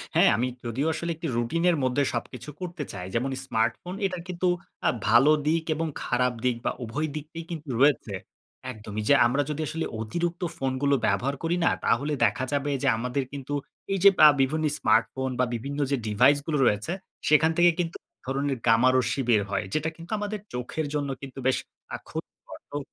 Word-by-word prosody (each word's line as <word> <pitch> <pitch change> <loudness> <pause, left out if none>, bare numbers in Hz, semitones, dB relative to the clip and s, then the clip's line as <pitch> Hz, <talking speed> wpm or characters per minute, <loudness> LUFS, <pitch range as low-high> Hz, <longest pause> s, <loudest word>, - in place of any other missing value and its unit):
হ্যাঁ, - - +6
আমি 125 - +1 0.2
যদিও 130 +7 -1
আসলে 170 +2 -3
একটি 165 +1 -5
রুটিনের 165 +9 +2
মধ্যে 130 +2 +2
সবকিছু 125 +3 -5
করতে 175 -3 -4
চাই। 90 -3 -6
যেমন 130 +3 0
স্মার্টফোন 115 - -1
এটা 185 -2 -2
কিন্তু 180 0 -1 0.4
আ - - +6 0.2
ভালো 120 +7 +6 0.2
দিক 160 +1 +2
এবং 165 +1 -1 0.2
খারাপ 125 0 +1
দিক 125 - +2
বা - - +2
উভয় 140 +8 -2
দিকটি 155 +2 -7
কিন্তু 155 -3 -6
রয়েছে। 140 -7 +3 0.6
একদমই। 110 -1 -6
যে - - +8
আমরা 125 +4 +2
যদি 150 +1 -2
আসলে 165 0 -3 0.2
অতিরিক্ত 170 - -2 0.2
ফোনগুলো 135 +1 +1
ব্যবহার 140 +3 0
করি 170 +2 +1
না, - - +5 0.2
তাহলে 145 +6 +1
দেখা 115 +4 0
যাবে 145 0 0
যে 140 - +2
আমাদের 125 +3 -1
কিন্তু 140 0 -5 0.4
এই 195 - 0
যে 200 - +11 0.2
আ - - +10
বিভিন্ন 155 +4 +1
স্মার্টফোন 115 +4 +1
বা 125 - +4
বিভিন্ন 140 +5 -5
যে 140 - +2
ডিভাইস 125 +7 +5
গুলো 150 -2 0
রয়েছে 105 +8 +1 0.4
সেখান 155 +2 +5
থেকে 175 0 +6
কিন্তু 170 -1 -1
১ - - -65
ধরনের 135 0 -1
গামারশ্মি 125 +3 +3
বের 110 -3 +5
হয়। 100 +1 -1
যেটা 155 +1 0
কিন্তু 165 +1 -12
আমাদের 210 0 -3
চোখের 125 +5 -3
জন্য 145 -2 -1
কিন্তু 135 -1 -8
বেশ 130 - +3 0.4
আ - - -3
ক্ষতিকর - - -8
তো 145 - -3
140 Hz, 185 wpm, -26 LUFS, 125-160 Hz, 0.6 s, যে